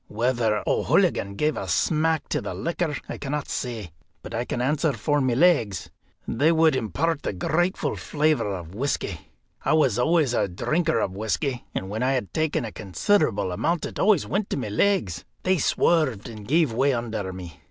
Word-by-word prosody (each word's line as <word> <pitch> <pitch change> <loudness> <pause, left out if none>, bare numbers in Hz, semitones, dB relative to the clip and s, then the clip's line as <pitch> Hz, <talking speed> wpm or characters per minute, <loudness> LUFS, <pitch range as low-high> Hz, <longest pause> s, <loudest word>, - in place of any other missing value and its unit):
Whether 115 -1 0
O'Hooligan 100 0 +2
gave 150 +7 +1
a - - -4
smack 160 0 +1
to - - 0
the - - -5
liquor 165 -2 -2
I - - -6
cannot 145 +1 -3
say, 115 -8 -4 0.3
but - - -8
I 115 +2 -1
can 125 - -3
answer 145 +4 +1
for 145 0 0
my 130 -3 +1
legs, 135 - +2 0.4
they 145 +7 +3
would 160 -3 +4
impart 140 - -1
a - - -1
grateful 175 - 0
flavour 150 -6 +1
of 90 -4 -5
whisky. 135 +7 -2 0.4
I - - +2
was 135 -8 +3
always 150 -1 +3
a 120 - +1
drinker 155 - 0
of 95 - -2
whisky, 120 +5 -2
and 95 - -2
when 105 +4 -4
I 130 +2 +2
had 125 -7 -2
taken 155 -6 0
a 110 - -6
considerable 100 - +1
amount 165 - 0
it - - -7
always 200 -4 +4
went 200 +2 -1
to - - -2
my 125 -6 -3
legs; 105 - +1 0.2
they 185 -1 +2
swerved, 140 - +2
and 110 -3 -9
gave 155 -3 +3
way 135 +4 +2
under 110 -5 -3
me. 90 -4 -9
130 Hz, 185 wpm, -25 LUFS, 105-160 Hz, 0.4 s, would